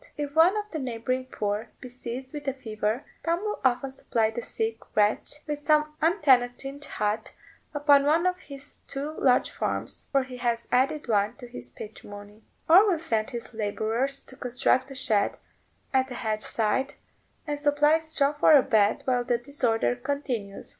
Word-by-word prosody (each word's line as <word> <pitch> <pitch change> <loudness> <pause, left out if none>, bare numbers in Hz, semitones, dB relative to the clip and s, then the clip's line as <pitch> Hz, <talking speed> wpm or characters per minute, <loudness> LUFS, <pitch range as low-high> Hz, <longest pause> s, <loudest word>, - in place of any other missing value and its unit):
If 290 -1 -4
one 335 +6 +5
of 420 0 -4
the 315 - -3
neighbouring 255 0 -2
poor 210 -2 -2
be 255 - -9
seized 250 +1 -7
with 295 -1 -7
a 270 - 0
fever, 220 -1 -3 0.2
Tom 335 +2 0
will 425 0 -3
often 260 +1 +1
supply 225 -4 0
the 235 - -4
sick 225 0 -3 0.2
wretch 210 +6 +2
with 295 -1 -4
some 300 0 +2
untenanted 275 -4 +2
hut 210 -4 -2 0.4
upon 285 -1 +5
one 320 +4 +3
of 365 0 +1
his 280 -2 -9
two 280 +2 -4
large 255 -2 +3
farms - - -4
(for 275 -2 +3
he 255 -1 -9
has 235 -1 -1
added 270 +4 +1
one 210 0 +1
to 245 -3 -11
his 125 - -9
patrimony), 205 - -11 0.3
or 380 +6 +7
will 355 - +2
send 225 -9 -1
his 240 -2 -7
labourers 225 +5 -1
to 260 - -10
construct 250 +1 +1
a 270 - -9
shed 220 -6 +1 0.6
at 265 0 +2
a 250 - -6
hedge 215 -3 -2
side, 230 +6 0 0.5
and 290 -1 -3
supply 295 +2 +3
straw 315 -3 0
for 300 +1 +5
a 280 -3 +8
bed 220 +2 +2
while 250 -2 +1
the 240 0 +1
disorder 240 -2 0
continues. 245 -6 -4
260 Hz, 175 wpm, -27 LUFS, 225-290 Hz, 0.6 s, a